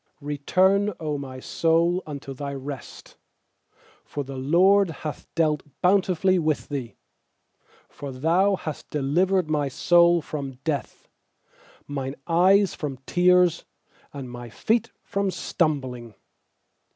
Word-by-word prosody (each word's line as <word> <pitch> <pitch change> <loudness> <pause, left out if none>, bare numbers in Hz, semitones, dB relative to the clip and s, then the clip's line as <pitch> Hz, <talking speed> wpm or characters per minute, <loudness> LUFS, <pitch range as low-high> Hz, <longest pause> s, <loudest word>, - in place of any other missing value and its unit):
7Return, 185 +8 +1
O 150 -2 -2
my 130 -2 -7
soul, 170 +5 +1
unto 140 -2 -6
thy 140 +1 -5
rest; 135 -1 -9 0.9
For 145 - -5
the 135 0 -8
LORD 180 +8 +4
hath 155 -1 -7
dealt 155 -3 +2 0.2
bountifully 185 -1 +3
with 155 -2 -1
thee. 135 -5 -5 1.0
8For 135 -3 -8
Thou 185 +7 +3
hast 155 -5 -7
delivered 175 +6 +1
my 150 -2 0
soul 170 +5 +4
from 140 -3 -5
death, 150 -2 -4 0.8
Mine 135 -1 -4
eyes 190 +4 +4
from 140 -4 -5
tears, 180 -1 +3 0.5
And 135 -4 -7
my 120 -1 -8
feet 225 - 0
from 200 0 -1
stumbling. 130 - -2
155 Hz, 115 wpm, -25 LUFS, 140-180 Hz, 1.0 s, LORD